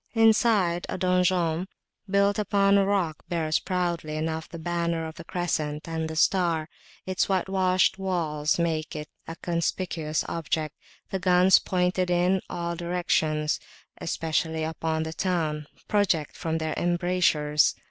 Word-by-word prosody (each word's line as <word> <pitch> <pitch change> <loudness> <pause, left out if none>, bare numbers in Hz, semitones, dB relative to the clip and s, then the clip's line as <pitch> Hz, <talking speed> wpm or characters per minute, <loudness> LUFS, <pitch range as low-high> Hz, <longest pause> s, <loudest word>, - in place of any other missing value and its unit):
Inside, 220 -6 +3
a - - -3
donjon, 180 -2 +1 0.4
built 200 +1 +3
upon 200 -1 +3
a 195 - +3
rock, 180 -7 0
bears 160 -3 +1
proudly 175 -4 -2
enough 160 0 -3
the 170 - -8
banner 170 0 -1
of 160 - -6
the 170 - -10
Crescent 155 -4 -2
and 160 -1 -3
the 160 - -5
Star; 170 -2 +2 0.4
its 185 +1 0
whitewashed 190 0 +2
walls 160 -6 0
make 160 -2 -1
it 150 0 -6 0.2
a 165 - -6
conspicuous 170 -2 -2
object, 155 -2 -2 0.4
and 190 - -2
guns 180 0 +6
pointed 180 0 0
in 180 +2 +2
all 170 -1 -3
directions, 160 -3 0 0.4
especially 160 0 -1
upon 160 0 -2
the 160 0 -5
town, 160 -4 -1 0.2
project 185 -8 +1
from 160 0 -2
their 160 -1 -2
embrasures. 175 -4 +2
170 Hz, 135 wpm, -26 LUFS, 160-185 Hz, 0.4 s, guns